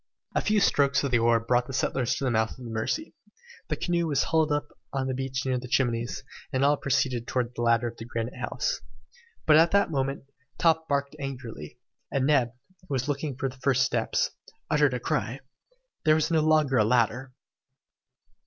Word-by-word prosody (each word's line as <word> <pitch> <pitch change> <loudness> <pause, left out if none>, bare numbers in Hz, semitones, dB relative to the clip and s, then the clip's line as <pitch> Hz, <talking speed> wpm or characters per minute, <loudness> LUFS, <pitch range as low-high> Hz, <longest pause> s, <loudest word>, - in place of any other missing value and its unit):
A - - +1
few 210 0 +2
strokes 140 -8 +3
of 140 - -1
the 120 - +4
oar 115 0 +4
brought 120 +2 +1
the 135 - -7
settlers 130 -1 0
to - - -4
the 130 - +1
mouth 110 +1 0
of 125 - -10
the 115 - -6
Mercy. 115 - -2 0.5
The - - -1
canoe 170 -1 0
was 145 -4 +2
hauled 160 -1 +1
up 145 0 -1 0.2
on 135 -1 -1
the 130 - -1
beach 130 0 -3
near 130 -1 0
the 125 - -8
Chimneys, 120 -2 0 0.3
and 135 0 +2
all 145 +1 +5
proceeded 130 -4 0
towards 125 -1 -1
the 120 - -5
ladder 115 0 +2
of 115 0 -10
Granite 115 0 -4
House. - - -2 0.6
But 155 -1 +6
at 165 +2 +6
that 200 -4 +3
moment, 135 -1 -1 0.3
Top 160 -1 +2
barked 140 +1 -1
angrily, 125 - -7 0.3
and 135 -1 +1
Neb, 135 -5 +3 0.4
who 140 - -2
was 130 +2 -1
looking 145 -2 -2
for 135 - -1
the 130 0 -8
first 130 -1 +2
steps, - - 0 0.4
uttered 145 -4 +3
a - - -2
cry. 120 +2 -2 0.6
There 155 -1 +5
was 160 +1 0
no 160 -1 +3
longer 155 -4 +3
a - - +5
ladder! 125 +3 +1
135 Hz, 195 wpm, -27 LUFS, 120-145 Hz, 0.6 s, But